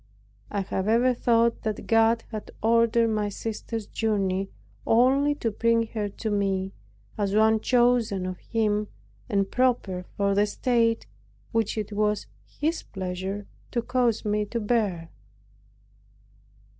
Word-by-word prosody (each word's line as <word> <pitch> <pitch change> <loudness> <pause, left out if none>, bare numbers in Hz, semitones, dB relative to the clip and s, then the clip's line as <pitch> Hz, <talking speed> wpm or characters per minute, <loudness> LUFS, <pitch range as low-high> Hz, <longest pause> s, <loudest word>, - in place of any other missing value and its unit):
I 200 - -1
have 190 0 -3
ever 240 +3 +4
thought 235 -1 +2
that 215 -1 -3
God 225 0 +3
had 215 -2 -6
ordered 230 0 +3
my 210 -1 0
sister's 225 +1 -5
journey 195 -3 -1 0.4
only 270 +5 +4
to 230 -5 -2
bring 230 +2 +2
her 210 -2 -3
to 220 +2 -4
me, 195 -2 0 0.5
as 200 -1 0
one 220 0 +4
chosen 240 -5 +2
of 185 -1 -5
Him 210 -2 0 0.4
and 195 -1 0
proper 235 -8 +1
for 200 0 +2
the 205 +1 +3
state 230 0 +1 0.5
which 225 -1 0
it 210 -1 -3
was 210 0 0 0.2
His 320 +3 -2
pleasure 190 +1 -5 0.2
to 235 -2 -1
cause 240 -3 +1
me 210 0 +1
to 235 +3 -3
bear. 205 -7 -1
220 Hz, 130 wpm, -26 LUFS, 200-230 Hz, 0.5 s, ever